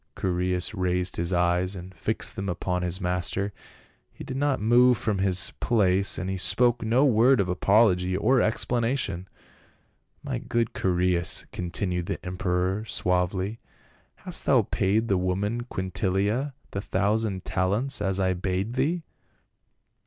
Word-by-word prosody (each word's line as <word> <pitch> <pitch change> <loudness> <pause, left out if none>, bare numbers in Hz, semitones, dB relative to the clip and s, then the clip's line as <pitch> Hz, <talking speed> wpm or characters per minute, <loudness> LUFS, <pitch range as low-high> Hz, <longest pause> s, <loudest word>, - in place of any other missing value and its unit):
Chaereas 90 0 0
raised 90 -2 -1
his 85 +1 -1
eyes 90 +2 +1
and 90 +1 -9
fixed 85 - -3
them 100 0 -3
upon 90 +1 -2
his 90 +1 -2
master; 90 +2 -1 0.6
he - - -10
did 130 -1 -6
not 140 0 +1
move 120 +3 +5
from 105 -3 -1
his 95 -2 +2
place, 100 -4 +2
and 95 - -3
he 95 0 -2
spoke 120 +7 +2
no 120 +5 +3
word 125 +1 +4
of 100 - +1
apology 95 -1 +3
or 130 +5 +3
explanation. 115 -5 -1 0.5
" - - -42
My - - -3
good 115 -1 -1
Chaereas," 90 -1 0
continued 90 0 -3
the - - -4
emperor 90 +1 -1
suavely, 90 +2 -1 0.3
" - - -35
hast - - -2
thou - - +5
paid 105 +4 +1
the 95 -3 +2
woman 100 +6 -1
Quintilia 100 +6 -1 0.2
the 100 - -3
thousand 100 -1 -1
talents, 105 +8 0
as 95 -1 0
I 95 -1 +2
bade 95 +4 -2
thee?" 155 +7 0
95 Hz, 145 wpm, -26 LUFS, 90-115 Hz, 0.6 s, move